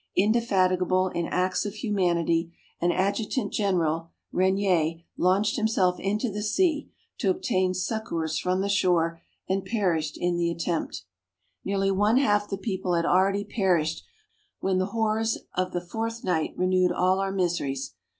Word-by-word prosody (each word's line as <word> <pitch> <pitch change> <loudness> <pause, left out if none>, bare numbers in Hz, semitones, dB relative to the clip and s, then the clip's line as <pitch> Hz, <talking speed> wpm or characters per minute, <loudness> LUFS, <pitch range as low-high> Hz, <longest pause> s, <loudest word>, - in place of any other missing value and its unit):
Indefatigable 185 -4 +2
in 170 -1 -2
acts 185 0 0
of 205 0 -5
humanity, 170 -6 0 0.3
an 175 +1 +2
adjutant 205 +5 -1
general, 165 -5 0 0.2
Renier, 185 -4 +2 0.2
launched 200 +6 +2
himself 200 -5 +1
into 210 +4 -1
the 210 +1 -4
sea, 300 - +1 0.3
to - - +1
obtain 190 - +1
succours 175 -6 -2
from 185 +1 0
the 200 - 0
shore, 175 -4 +1 0.3
and 190 0 0
perished 170 -9 -1
in 175 0 0
the 170 0 +1
attempt. 170 - -3 0.6
Nearly 195 0 0
one 205 +5 +3
half 205 -6 +2
the 195 - -2
people 190 -3 -2
had 170 0 +1
already 195 +3 +3
perished, 175 -7 0 0.6
when 190 -1 +1
the 185 - 0
horrors 220 +1 0 0.2
of 185 0 -1
the 175 - -2
fourth 225 +5 -4
night 160 -4 -1
renewed 185 0 +2
all 185 +1 +2
our 195 0 -1
miseries. 170 -8 -1
185 Hz, 145 wpm, -26 LUFS, 175-205 Hz, 0.6 s, one